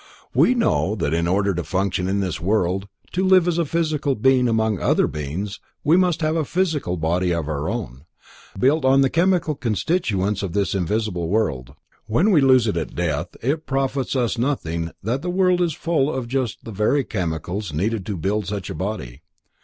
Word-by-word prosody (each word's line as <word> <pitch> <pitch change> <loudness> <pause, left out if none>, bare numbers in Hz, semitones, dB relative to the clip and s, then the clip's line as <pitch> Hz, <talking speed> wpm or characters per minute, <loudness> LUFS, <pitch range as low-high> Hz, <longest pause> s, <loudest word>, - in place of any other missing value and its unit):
We 255 - +4
know 165 - +1
that 80 -7 -1
in 85 +1 +1
order 100 +2 +1
to 85 0 -3
function 95 0 -1
in 100 +1 0
this 90 -5 -3
world, 95 0 0 0.2
to 185 - 0
live 185 -2 +5
as 170 -1 +1
a 170 - +2
physical 155 -3 0
being 130 +2 +3
among 110 -3 +1
other - - +2
like - - 0
beings, 80 +7 -4 0.2
we 155 +3 +4
must 180 -3 +2
have 155 0 +1
a 160 - +1
physical 155 - -1
body 85 +3 0
all 80 -3 -3
our 75 +2 -2
own, 90 - -5 0.5
built 140 +8 +2
of 135 +1 +5
the 135 - +1
chemical 170 -2 +2
constituents 105 - -1
of 100 -4 -4
this 100 -1 0
visible 95 -2 -1
world. 70 - -1 0.3
When 165 - +3
we 160 -7 +5
lose 130 -3 +5
it 105 -6 -1
at 80 - -4
death, 75 -4 -2
it 150 +6 -1
profits 135 0 -1
us 120 -2 0
nothing 85 - -1
that 120 +6 -1
the 180 - -3
world 180 0 +2
is 170 -3 +1
full 155 -2 0
of 130 -4 -3
just 125 -3 -2
the 115 - -6
very 110 +8 +1
chemicals 90 -1 -3
needed 100 +7 -1
to 100 -3 -3
build 100 +4 -1
such 100 -2 -4
a - - -3
body. 80 - -5
110 Hz, 195 wpm, -22 LUFS, 90-145 Hz, 0.5 s, live